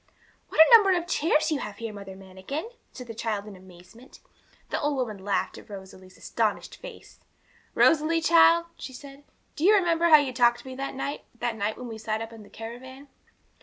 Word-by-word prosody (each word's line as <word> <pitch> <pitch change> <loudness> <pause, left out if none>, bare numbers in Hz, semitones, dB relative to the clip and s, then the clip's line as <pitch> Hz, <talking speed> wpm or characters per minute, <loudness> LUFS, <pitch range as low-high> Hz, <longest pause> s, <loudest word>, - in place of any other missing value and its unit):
'What - - -5
a 320 +9 +10
number 390 -5 +5
of 345 - -3
chairs 315 -2 +1
you 300 - 0
have 210 -4 -6
here, 225 -2 -6
Mother 200 -2 -9
Manikin!' 190 - -7 0.2
said 250 - -10
the 230 - -8
child 215 -2 -3
in 210 -2 -10
amazement. 185 +7 -16 0.5
The - - -1
old 295 -1 0
woman 220 -7 -4
laughed 200 0 -2
at - - -17
Rosalie's 190 -2 -12
astonished - - -2
face. - - -12 0.6
'Rosalie, 325 +1 +3
child,' 335 +1 +5
she 260 - -8
said, 275 +2 -12 0.3
'do 300 - -5
you 415 +4 +6
remember 340 -3 +2
how 310 - +10
you 280 -3 -1
talked 240 -1 +3
to - - -15
me 260 - -7
that 270 +1 -5
night 280 +2 -5
the 240 0 -1
night 215 -1 -3
when 250 - -8
we 225 -1 -8
sat 215 0 -3
up 225 0 -7
in 225 - -12
the 205 - -15
caravan?' 260 +5 -10
250 Hz, 205 wpm, -26 LUFS, 210-310 Hz, 0.6 s, a